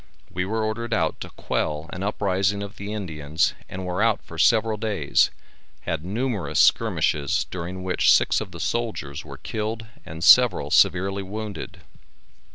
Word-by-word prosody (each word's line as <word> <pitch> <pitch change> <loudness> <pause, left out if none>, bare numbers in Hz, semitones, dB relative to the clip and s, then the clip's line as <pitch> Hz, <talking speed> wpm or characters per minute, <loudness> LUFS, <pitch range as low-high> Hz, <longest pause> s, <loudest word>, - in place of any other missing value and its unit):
We 90 +1 -1
were 110 +3 -1
ordered 115 +1 -2
out 80 -2 0
to - - -6
quell 75 +1 -3
an 90 - -6
uprising 100 0 0
of 100 0 -9
the 100 +1 -6
Indians, 80 -6 -1 0.2
and 95 0 -6
were 90 +2 -2
out 115 -2 +3
for 80 -3 -10
several 110 +3 +3
days, 105 -9 +1 0.5
had 80 +2 -3
numerous 110 +2 -2
skirmishes 75 +4 +2
during 90 +1 -5
which 90 0 +3
six - - +4
of - - -6
the - - -10
soldiers 110 -11 -3
were 70 -2 -10
killed 110 - -4 0.2
and 80 - -8
several 125 0 +6
severely 95 +3 +3
wounded. 105 +1 -7
95 Hz, 155 wpm, -24 LUFS, 85-110 Hz, 0.5 s, several